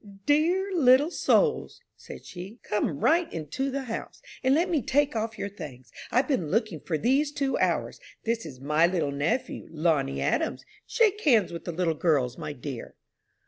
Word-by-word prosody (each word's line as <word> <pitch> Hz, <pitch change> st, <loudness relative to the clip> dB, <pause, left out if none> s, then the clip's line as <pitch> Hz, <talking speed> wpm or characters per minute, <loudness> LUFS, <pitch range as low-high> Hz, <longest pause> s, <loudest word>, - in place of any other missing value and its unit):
"Dear 345 Hz, +7 st, +2 dB
little 285 Hz, -1 st, +5 dB
souls," 450 Hz, +4 st, +1 dB, 0.2 s
said -, -, -11 dB
she, 190 Hz, +5 st, -9 dB
"come 185 Hz, -8 st, -1 dB
right 335 Hz, +2 st, +3 dB
into 165 Hz, -, -3 dB
the 275 Hz, 0 st, -3 dB
house, 230 Hz, -3 st, -6 dB, 0.2 s
and 260 Hz, +1 st, +4 dB
let 340 Hz, +4 st, +2 dB
me 330 Hz, -6 st, +1 dB
take 280 Hz, +2 st, +1 dB
off 220 Hz, 0 st, -2 dB
your -, -, -3 dB
things. 145 Hz, -, -10 dB, 0.2 s
I've 255 Hz, +2 st, +2 dB
been 185 Hz, -, 0 dB
looking 215 Hz, -4 st, 0 dB
for 160 Hz, -, -3 dB
you -, -, -3 dB
these 275 Hz, +5 st, +2 dB
two 275 Hz, -3 st, -1 dB
hours. -, -, 0 dB, 0.2 s
This 230 Hz, 0 st, -1 dB
is 140 Hz, -6 st, -9 dB
my 150 Hz, +5 st, +3 dB
little 170 Hz, -5 st, -1 dB
nephew, 145 Hz, -, -2 dB
Lonnie 155 Hz, -4 st, 0 dB
Adams. -, -, -1 dB, 0.2 s
Shake 425 Hz, -3 st, +2 dB
hands 225 Hz, -, +3 dB
with 170 Hz, -, -7 dB
the 175 Hz, -, -3 dB
little 170 Hz, -1 st, 0 dB
girls, 145 Hz, -6 st, +1 dB
my -, -, -5 dB
dear." 135 Hz, -3 st, -7 dB
215 Hz, 180 wpm, -27 LUFS, -, 0.2 s, little